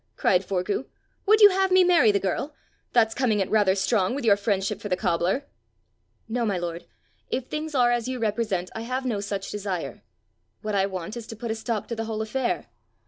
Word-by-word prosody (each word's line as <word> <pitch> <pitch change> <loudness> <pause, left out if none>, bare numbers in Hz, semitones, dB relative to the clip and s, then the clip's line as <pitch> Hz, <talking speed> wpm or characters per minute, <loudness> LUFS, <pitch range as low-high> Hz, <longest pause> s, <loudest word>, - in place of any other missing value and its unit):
cried 185 0 +2
Forgue. 195 +6 -2 0.4
"Would 430 +1 +5
you 410 -1 +10
have 385 0 +2
me 370 0 +6
marry 340 -11 +5
the 200 - +1
girl? 195 - -2 0.4
That's 225 -2 +3
coming 230 -6 +1
it 190 - -1
rather 205 -3 +4
strong 195 +2 +1
with 280 - -3
your 205 -3 +6
friendship 200 0 -1
for 205 - -5
the 180 - +1
cobbler!" 175 +11 0 0.8
"No, 235 +2 -1
my 205 -4 0
lord; 170 -1 -5 0.4
if 260 - -2
things 305 0 -4
are 245 -2 +4
as 240 -1 0
you 260 0 -3
represent, 210 -5 -1
I 225 - -5
have 255 +3 -3
no 225 -5 -1
such 200 -1 -4
desire. 195 -4 -4 0.6
What 215 0 -2
I 195 -1 +2
want 190 +2 -5
is 230 -2 -8
to 225 - -7
put 230 +1 -4
a - - -1
stop 225 -1 -3
to 235 - -2
the 225 0 -3
whole 220 -1 -3
affair. 245 +3 -2
220 Hz, 210 wpm, -25 LUFS, 195-245 Hz, 0.8 s, you